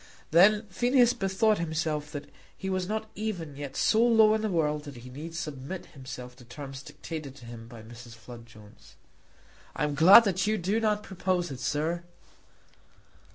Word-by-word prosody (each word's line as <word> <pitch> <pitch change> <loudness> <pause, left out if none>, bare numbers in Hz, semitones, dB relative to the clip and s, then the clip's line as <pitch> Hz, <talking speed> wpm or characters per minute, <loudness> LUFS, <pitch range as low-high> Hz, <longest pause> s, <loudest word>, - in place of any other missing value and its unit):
Then 205 +6 +5
Phineas 245 +4 +3
bethought 195 +1 +1
himself 155 -2 -2
that 145 -1 -7 0.3
he 190 -1 -4
was 185 -1 -1
not 220 +1 -4
even 180 -9 -4
yet 140 -1 -7
so 225 +1 +3
low 225 -2 +5
in 220 - 0
the 215 - -1
world 150 -4 0
that 145 -2 -9
he 125 +1 -11
need 160 +5 -8
submit 155 +2 -6
himself 125 -3 -9
to 125 - -14
terms 135 +2 -9
dictated 150 -1 -8
to 125 -4 -14
him 115 -1 -10
by 115 -2 -12
Mrs. 120 +1 -12
Flood 115 0 -12
Jones. 105 -3 -17 0.8
"I - - -2
am 150 -1 0
glad 180 +10 +9
that 190 -1 0
you 215 0 +1
do 195 +5 0
not 210 -2 0
propose 180 -2 -2
it, 130 - -7
sir." 155 +6 -1
160 Hz, 175 wpm, -28 LUFS, 135-200 Hz, 0.8 s, glad